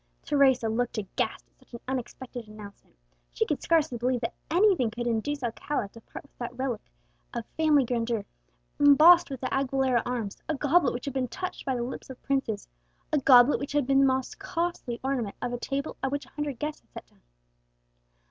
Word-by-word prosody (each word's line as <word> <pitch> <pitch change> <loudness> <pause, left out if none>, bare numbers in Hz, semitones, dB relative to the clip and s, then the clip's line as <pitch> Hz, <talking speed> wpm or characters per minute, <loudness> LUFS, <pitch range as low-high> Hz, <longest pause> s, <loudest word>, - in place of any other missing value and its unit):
Teresa 265 -5 +3
looked 235 +2 -1
aghast 200 -3 -3
at - - -40
such - - -32
an - - -7
unexpected 250 -2 -5
announcement. 210 -1 -13 0.4
She - - +1
could - - -2
scarcely 315 -7 +1
believe 250 0 0
that 230 - -2 0.2
anything 350 - +3
could 240 +2 -5
induce 240 +5 -1
Alcala 240 -1 -2
to 230 - -14
part - - -10
with 285 - -25
that 240 - -3
splendid - - -18
relic 255 -5 -2 0.5
of 235 -2 -3
family 305 -4 +4
grandeur, 230 -3 -1 0.5
embossed 310 +5 +7
with 270 -3 -6
the 255 - -2
Aguilera 265 -2 +1
arms 235 -5 -3
a 315 - +1
goblet 285 -2 +2
which 245 - -5
had 280 - -4
been 260 -2 -1
touched 365 +9 -6
by 265 - +1
the 240 - -2
lips 250 +2 -6
of 260 - -9
princes 270 -7 -1 0.5
a 300 - +4
goblet 255 0 +6
which 280 - -5
had 290 -2 +2
been 270 +1 +3
the 275 - +6
most 260 +4 -1
costly 340 -10 -3
ornament 250 -6 -2
of 245 0 -3
a 245 - -3
table 275 +2 -3
at 270 - 0
which 285 0 -3
a - - -19
hundred 295 -3 -4
guests 300 +3 -4
had - - -37
sat - - -9
down. - - -30
260 Hz, 205 wpm, -27 LUFS, 240-285 Hz, 0.5 s, embossed